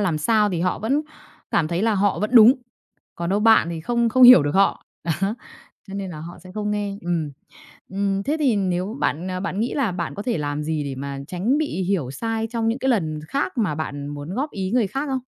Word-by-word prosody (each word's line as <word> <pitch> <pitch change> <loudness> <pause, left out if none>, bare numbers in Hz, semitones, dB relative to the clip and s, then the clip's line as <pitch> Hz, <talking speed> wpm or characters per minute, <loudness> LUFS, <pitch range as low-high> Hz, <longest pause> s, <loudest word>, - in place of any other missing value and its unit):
làm 175 -6 0
sao 210 +5 +2
thì 175 -4 -2
họ 180 +1 0
vẫn 270 +8 0 0.5
cảm 155 -2 +1
thấy 175 +2 -1
là 225 -1 +2
họ 200 0 +1
vẫn 210 +2 -1
đúng. 230 +1 +9 0.6
Còn 170 +1 -3
đâu 205 - +1
bạn 220 -6 +5
thì 165 -1 -5
không 235 +6 +1
không 255 +3 +3
hiểu 245 - +10
được 145 +3 -2
họ. 195 0 +2 0.2
Đó. 170 - 0 0.8
Cho 195 - -7
nên 195 -2 -4
là 155 -3 -8
họ 170 +2 -9
sẽ 185 0 -13
không 210 0 -3
nghe. 205 -1 -3
Ừm. 170 -4 -2 0.6
Ừm. 195 0 -1
Thế 295 - 0
thì 265 -7 +2
nếu 190 +2 -1
bạn, 165 +5 -1
ờ, 185 0 -3
bạn 195 0 -3
nghĩ 235 +3 -1
là 265 -8 0
bạn 175 -2 -4
có 205 - -5
thể 235 -8 -1
làm 145 0 -3
gì 155 -1 -2
để 140 -2 -5
mà 140 +1 -5
tránh 200 +10 0
bị 295 -11 -2
hiểu 175 -9 -1
sai 225 +7 -3
trong 230 -2 -1
những 235 +4 0
cái 265 - 0
lần 160 -10 0
khác 280 - -2
mà 200 -10 0
bạn 145 -2 -5
muốn 145 +4 -6
góp 285 +4 -2
ý 190 -1 -3
người 235 -4 +2
khác 275 +8 -3
không? 265 -1 -1
195 Hz, 245 wpm, -22 LUFS, 165-225 Hz, 0.8 s, hiểu